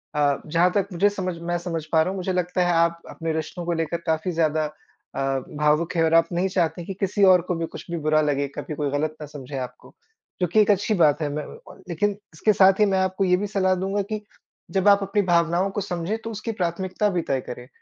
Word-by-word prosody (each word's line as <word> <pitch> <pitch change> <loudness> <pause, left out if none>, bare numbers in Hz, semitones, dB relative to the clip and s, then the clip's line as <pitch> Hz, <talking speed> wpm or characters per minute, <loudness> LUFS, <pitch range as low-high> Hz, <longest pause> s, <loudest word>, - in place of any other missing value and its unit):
अ, 145 -1 +2
जहाँ 170 +3 +2
तक 200 -1 +2
मुझे 200 +4 +3
समझ 185 -4 -4
मैं 175 +1 -1
समझ 165 -3 -4
पा 160 - +4
रहा 170 - +1
हूँ, 195 - -4
मुझे 185 0 -2
लगता 180 0 0
है 175 - +2
आप 170 0 +2
अपने 165 -1 -4
रिश्तों 160 +2 -4
को 175 - 0
लेकर 165 +1 -1
काफ़ी 160 +3 0
ज़्यादा 155 -2 +1 0.5
अ, - - -3 0.4
भावुक 150 +3 +1
हैं 165 - +3
और 160 0 +2
आप 165 0 +5
नहीं 180 +2 +1
चाहते 175 -2 0
कि 195 - -5
किसी 200 +1 +1
और 185 -2 +6
को 180 - 0
भी 165 0 -2
कुछ 165 - -10
भी 170 - -2
बुरा 155 0 +2
लगे, 140 -1 0
कभी 155 - -5
कोई 145 -1 -1
गलत 155 +2 -1
ना - - -4
समझे 140 -1 -8
आपको। 125 -1 -8 0.5
जो 180 - +3
कि 215 +6 +2
एक 210 - +4
अच्छी 205 +2 +1
बात 155 -2 +4
है 150 - 0
मैं 150 +1 -3
म - - -11 0.3
लेकिन 205 +5 +1 0.2
इसके 215 +7 +2
साथ 190 0 +5
ही 210 - +6
मैं 190 -1 +1
आपको 190 +1 0
ये 180 -1 +4
भी 205 +1 -2
सलाह 190 -2 +1
दूँगा 195 +2 -1
कि 215 0 -2 0.5
जब 190 +2 +1
आप 200 0 +7
अपनी 200 +1 +1
भावनाओं 175 +1 +2
को 205 - -3
समझें 180 +2 -3
तो 225 - -5
उसकी 220 +2 -4
प्राथमिकता 185 +1 -1
भी 180 -3 0
तय 135 -4 -1
करें, 125 0 -9
175 Hz, 245 wpm, -24 LUFS, 160-190 Hz, 0.5 s, आप